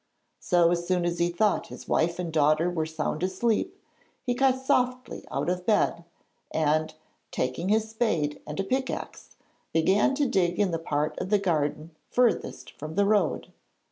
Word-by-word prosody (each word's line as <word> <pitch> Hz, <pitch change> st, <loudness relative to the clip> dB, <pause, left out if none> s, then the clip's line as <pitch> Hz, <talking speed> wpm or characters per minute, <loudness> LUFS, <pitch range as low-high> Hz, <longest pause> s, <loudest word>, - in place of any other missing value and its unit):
So 175 Hz, -2 st, +3 dB
as 175 Hz, 0 st, -1 dB
soon 180 Hz, -2 st, +1 dB
as 170 Hz, 0 st, -1 dB
he 170 Hz, 0 st, +2 dB
thought 200 Hz, +4 st, +1 dB
his -, -, -11 dB
wife 170 Hz, +1 st, +1 dB
and 170 Hz, -3 st, -4 dB
daughter 155 Hz, +3 st, +3 dB
were 160 Hz, -3 st, -1 dB
sound 160 Hz, 0 st, -3 dB
asleep, 190 Hz, +5 st, 0 dB, 0.5 s
he 245 Hz, -, 0 dB
got 260 Hz, +1 st, +2 dB
softly 250 Hz, -1 st, 0 dB
out -, -, -2 dB
of 180 Hz, 0 st, -1 dB
bed 205 Hz, -5 st, +2 dB, 0.4 s
and, 155 Hz, 0 st, +1 dB, 0.4 s
taking 130 Hz, +9 st, -2 dB
his 220 Hz, +1 st, +1 dB
spade 165 Hz, -11 st, -1 dB
and 150 Hz, +3 st, -5 dB
a -, -, +1 dB
pickaxe, 260 Hz, +6 st, -4 dB, 0.4 s
began 190 Hz, -, +3 dB
to 290 Hz, 0 st, +1 dB
dig 180 Hz, -5 st, +1 dB
in 200 Hz, -3 st, +2 dB
the 165 Hz, -, -1 dB
part 150 Hz, -2 st, -2 dB
of -, -, -4 dB
the 210 Hz, -, +4 dB
garden 160 Hz, -4 st, -1 dB, 0.2 s
furthest 245 Hz, -2 st, 0 dB
from 155 Hz, +2 st, -6 dB
the 200 Hz, -, +3 dB
road. 210 Hz, 0 st, +1 dB
175 Hz, 170 wpm, -27 LUFS, 160-215 Hz, 0.5 s, the